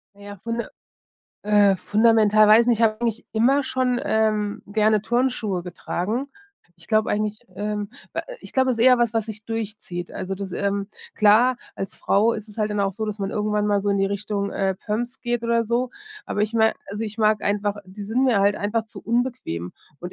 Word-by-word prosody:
Na 205 - -18
ja, 205 0 -9
funde 230 +4 -4 0.7
äh, 205 -2 +4
fundamental 215 +1 +4
weiß 225 +2 +7
nicht. 240 -3 +3
Ich 230 - +1
habe 215 0 +1
eigentlich 230 -1 -2
immer 260 +6 +3
schon, 255 -2 0
ähm, 215 -2 0
gerne 215 0 +2
Turnschuhe 235 -6 0
getragen. 195 +8 -3 0.5
Ich 170 - -18
glaube 215 -1 +2
eigentlich, 210 0 -1 0.2
ähm 210 +1 -3 0.5
ich - - -11
glaube, 260 -1 +2
es 235 - -1
ist 230 - +3
eher 250 -1 +7
was, 235 -2 +2
was 225 -2 0
sich 215 -1 -8
durchzieht. 215 -6 -5
Also, 190 +1 -4
das 195 0 -6
ähm, 200 +1 -2 0.3
klar, 225 +4 +5 0.2
als 195 +2 -5
Frau 220 +4 +2
ist 215 0 -6
es 210 - -13
halt 215 0 +1
dann 210 -1 -1
auch 195 0 +1
so, 220 +3 -4
dass 210 -1 -5
man 195 +1 -2
irgendwann 210 0 0
mal 205 -1 +2
so 205 - 0
in 200 - +1
die 195 - +2
Richtung, 200 0 -2
äh, 190 -1 0
Pumps 235 +6 -4
geht 240 -1 -2
oder 230 0 +2
so. 240 +3 0 0.4
Aber 205 - -2
ich 215 +1 -1
mein 220 -1 +4
also, 210 +3 -4
ich 215 -1 -5
mag 215 -2 +2
einfach 205 0 0
die 190 +3 -10
sind 230 +6 0
mir 230 -6 +3
halt 200 +1 +3
einfach 220 +2 -1
zu - - -11
unbequem 235 - -2 0.3
und 180 +1 -7
215 Hz, 205 wpm, -23 LUFS, 200-230 Hz, 0.7 s, weiß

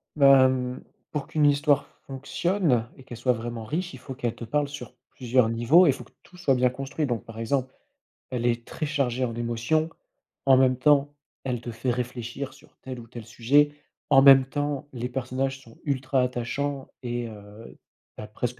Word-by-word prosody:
Bah, 135 -2 +7
hem, 125 -1 -1 0.3
pour 150 -2 -3
qu'une 150 -1 +1
histoire 145 0 +3 0.2
fonctionne 140 - 0
et 135 - -14
qu'elle 120 -3 -9
soit 125 +2 +2
vraiment 115 -1 -5
riche, 175 - -3
il - - -8
faut 135 - -8
qu'elle 120 -2 -3
te 120 - -9
parle 145 +6 0
sur 145 +1 -9 0.2
plusieurs 125 -2 +1
niveaux 120 +11 +5
et - - +5
il - - +4
faut - - -9
que - - -22
tout 180 - -18
soit 160 -6 +2
bien 125 0 +3
construit. 135 +4 -3
Donc, 120 -5 -3
par 115 -1 -10
exemple, 130 +3 -1 0.6
elle 120 -2 -2
est 120 -1 0
très 155 - -4
chargée 135 -4 0
en 120 -2 -1
émotions, 120 +7 0 0.6
en 135 -1 +6
même 130 -1 +4
temps, 145 +1 +3 0.3
elle 125 -3 -2
te 120 - -6
fait 115 +3 -3
réfléchir 125 +2 -4
sur 140 - -21
tel 130 -2 -7
ou 115 - -11
tel 115 -1 -9
sujet, 135 +6 +3 0.4
en 135 - +7
même 135 -1 +8
temps, 145 +1 -3
les 125 -1 -4
personnages 130 +1 -3
sont 115 -3 -18
ultra 130 -2 0
attachants 130 +3 -2
et 120 -1 -3
heu, 105 +1 -12 0.4
tu - - -7
as - - -8
presque 120 +3 -4
130 Hz, 195 wpm, -26 LUFS, 120-140 Hz, 0.6 s, même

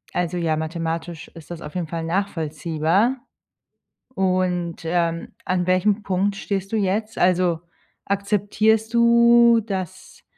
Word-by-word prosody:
Also 180 0 -1
ja, 165 -2 0
mathematisch 165 +1 -4
ist 165 -2 -14
das 170 -1 -7
auf 150 - -8
jeden 175 -3 -3
Fall 165 0 -4
nachvollziehbar. 165 - 0 1.0
Und, 180 -3 -1
ähm, 170 0 -1
an 180 -1 -1
welchem 195 +3 +2
Punkt 195 +1 0
stehst 195 0 -3
du 220 - 0
jetzt? 210 +2 -1
Also 180 -2 +2 0.5
akzeptierst 210 +3 +1
du, 235 0 +6
dass, 190 -5 -6
185 Hz, 120 wpm, -22 LUFS, 165-205 Hz, 1.0 s, du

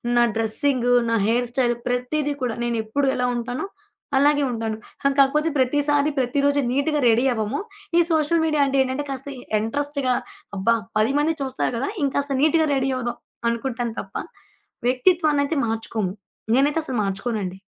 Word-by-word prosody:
నా 240 - +5
డ్రస్సింగు, 245 +3 +2 0.2
నా 230 - +2
hair 240 +2 +1
style 240 -2 +1
ప్రతీది 250 +4 -1
కూడా, 240 -3 -1
నేనెప్పుడు 235 +3 -1
ఎలా 250 - 0
ఉంటానో 245 +7 -3 0.5
అలాగే 290 +1 +4
ఉంటాను. 225 -2 -3 0.4
కాకపోతే 300 +4 +4
ప్రతిసారి, 290 +3 +2
ప్రతి 255 +2 0
రోజు 285 0 +3
నీట్‌గా 290 +3 +1
రెడీ 230 +3 +3
అవ్వము. 220 - -2 0.4
ఈ - - +7
సోషల్ 320 +1 +2
మీడియా 305 -2 +2
అంటే 275 0 +1
ఏంటంటే, 260 +3 -3
కాస్త 270 +1 -5 0.3
ఇంట్రెస్ట్‌గా 280 +2 -1 0.4
అబ్బా 230 +5 +3 0.2
10 220 +5 +2
మంది 320 +2 +1
చూస్తారు 265 -1 -2
గదా 265 - -1 0.2
ఇంకాస్త 275 0 -1
నీట్‌గా 315 +1 +3
రడీ 270 0 0
అవ్వుదాం 240 -1 -3 0.3
అనుకుంటాను 235 -1 -3
తప్ప, - - -16 0.7
వ్యక్తిత్వాన్నయితే 295 +2 +2
మార్చుకోము. 220 -3 -2 0.4
నేనైతే 290 +4 +2
అసలు 260 -5 -3
మార్చుకోనండి. 195 -1 -3
260 Hz, 140 wpm, -23 LUFS, 235-290 Hz, 0.7 s, ఈ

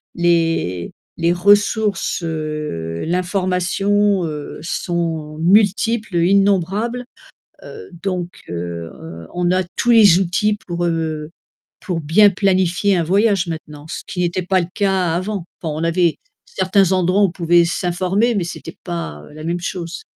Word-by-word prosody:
les 165 - 0 0.2
les 170 0 +2
ressources, 205 +1 +2
heu, 150 - -4
l'information, 185 +2 +1
heu, 150 -2 -6
sont 165 -3 -3
multiples, 210 +2 +2
innombrables, 200 +6 +2 0.6
heu, 445 - -10
donc 180 -3 -2 0.2
heu, 85 -1 -5 0.4
on 175 0 0
a 185 +1 +2
tous 240 - +1
les 205 -6 +7
outils 200 +3 +1
pour, 175 -1 -2
heu, 160 -2 -2 0.5
pour 180 -4 -3
bien 195 +8 +5
planifier 190 0 +2
un 170 - +2
voyage, 195 +1 +2
maintenant, 155 -2 -7
ce - - -5
qui 180 - -5
n'était 175 +1 0
pas 185 +1 +2
le 170 - -2
cas 190 -5 +1
avant, 185 0 -3 0.2
enfin, 160 -3 -2
on 165 - -2
avait 170 0 +1 0.3
certains 190 0 +2
endroits 185 +2 +2
où - - +6
on 185 - -4
pouvait 175 -1 +3
s'informer 185 +6 0
mais 190 -5 0
c'était 165 -1 -8
pas, 170 - -5
heu, - - -15
la 155 - -9
même 170 +1 -2
chose. 170 -1 -5
175 Hz, 145 wpm, -19 LUFS, 165-195 Hz, 0.6 s, les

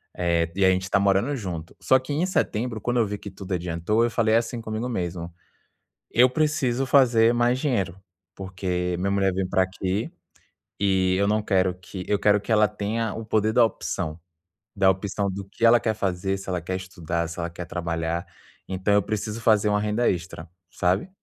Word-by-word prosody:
Eh, 85 -1 0
e 95 - +4
aí, 95 - +5
gente 95 0 -1
está 95 +2 +1
morando 100 +8 +2
junto. 85 -6 -6
Só 130 - +5
que, 130 +3 -8
em 160 +5 +1
setembro, 115 - -1
quando 120 +1 -1
eu 115 - +3
vi 105 0 -4
que 100 -1 -9
tudo 95 0 -7
adiantou, 90 +6 0
eu 120 - +1
falei, 110 -1 +2
assim, 115 +1 0
comigo 110 +3 -4
mesmo: 85 -5 -4 0.8
"Eu 125 +2 +5
preciso 135 -3 0
fazer 120 -4 +5
mais 120 +1 +2
dinheiro, 100 - -1 0.4
porque 90 -2 -3
minha 100 +1 0
mulher 95 -1 +2
veio 95 0 -1
pra 95 - +2
aqui, 95 +2 -3 0.7
e 95 -2 +2
eu 100 0 +2
não 105 +1 +2
quero 95 -3 +2
que 90 0 -9
eu 105 - +2
quero 105 0 +4
que 110 - -7
ela 105 -1 +5
tenha 105 +1 -2
o 115 -1 -6
poder 110 0 +1
da 120 -2 +6
opção. 80 -7 -3 0.6
Da 95 -1 +5
opção 100 +1 -2
do 100 +1 -6
que 115 - -4
ela 115 0 +7
quer 110 -2 0
fazer, 95 -1 -1
se 95 - -10
ela 90 -1 -1
quer 95 +3 -3
estudar, 85 -3 -3
se 85 - -8
ela 85 0 -2
quer 90 +1 -7
trabalhar. 85 0 -3 0.4
Então 95 +2 -1
eu 100 - +4
preciso 110 +2 -3
fazer 110 -2 +3
uma 105 0 +2
renda 105 +3 +1
extra, 85 -2 -5 0.2
sabe? 90 - 0
100 Hz, 200 wpm, -25 LUFS, 90-115 Hz, 0.8 s, ela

